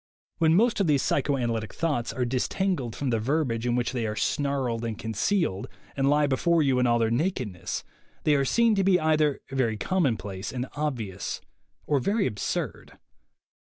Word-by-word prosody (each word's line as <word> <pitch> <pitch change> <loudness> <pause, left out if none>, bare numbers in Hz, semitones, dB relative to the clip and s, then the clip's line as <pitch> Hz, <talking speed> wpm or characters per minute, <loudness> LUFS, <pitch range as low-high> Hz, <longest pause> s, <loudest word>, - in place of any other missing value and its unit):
When 160 -1 +4
most 230 +4 +3
of 195 - +2
these 145 -3 +3
psychoanalytic 120 -6 0
thoughts 150 -8 -1
are 125 - -1
disentangled 130 - -1
from 140 -3 -2
the 115 - +1
verbiage 125 -2 0
in 120 - +1
which 120 -1 0
they 120 -4 -2
are 105 - -3
snarled 130 -2 -1
and 115 -2 -3
concealed, 110 - -1 0.3
and 135 0 +2
lie 150 +1 +4
be 135 -2 +1
fore 170 +1 +3
you 135 -3 +2
in 125 - +3
all 120 0 +3
their 115 -1 +1
nakedness, 120 - -2 0.4
they 150 - +3
are 140 -1 +3
seen 230 - +3
to 195 -2 +2
be 185 -1 +4
either 155 -3 +2
very 120 -5 0
commonplace 105 - -1
and 125 0 -3
obvious, 120 -11 -3 0.5
or 145 -2 +2
very 200 - +1
ab 105 - -3
surd. - - -4
135 Hz, 180 wpm, -27 LUFS, 115-155 Hz, 0.5 s, When